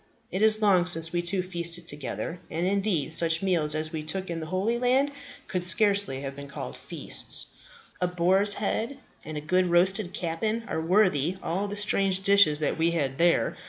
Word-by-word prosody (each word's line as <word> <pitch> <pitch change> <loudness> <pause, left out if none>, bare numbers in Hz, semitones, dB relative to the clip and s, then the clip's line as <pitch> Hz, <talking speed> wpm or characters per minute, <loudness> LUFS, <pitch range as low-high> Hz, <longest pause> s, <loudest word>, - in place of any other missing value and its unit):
It 190 - -3
is 215 0 +3
long 185 -4 +3
since 165 -1 -2
we 175 - -1
two 180 +2 -1
feasted 170 -2 -2
together; 150 +4 -6
and, 165 +2 -3
indeed, 190 -6 -1
such 165 +1 +2
meals 165 -5 +1
as 155 0 -3
we 160 - -5
took 175 +4 -4
in 165 - -5
the 160 - -7
Holy 195 +7 -2
Land 260 +3 +1 0.4
could 180 -1 -2
scarcely 200 -5 +3
have 135 -1 -7
been 140 0 -10
called 65 - -8
feasts. - - +4 0.5
A 180 - +1
boar's 185 +3 +2
head 230 +5 -3 0.3
and 155 -1 -8
a - - -5
good 180 +4 0
roasted 180 +2 +1
capon 215 +7 -3
are 160 - -4
worthy 180 -2 +1
all 190 +5 -3
the 205 - -6
strange 195 -2 0
dishes 195 -6 +4
that 155 +2 -2
we 165 +1 +2
had 140 -5 -3
there. 170 0 +1
175 Hz, 190 wpm, -25 LUFS, 160-200 Hz, 0.5 s, feasts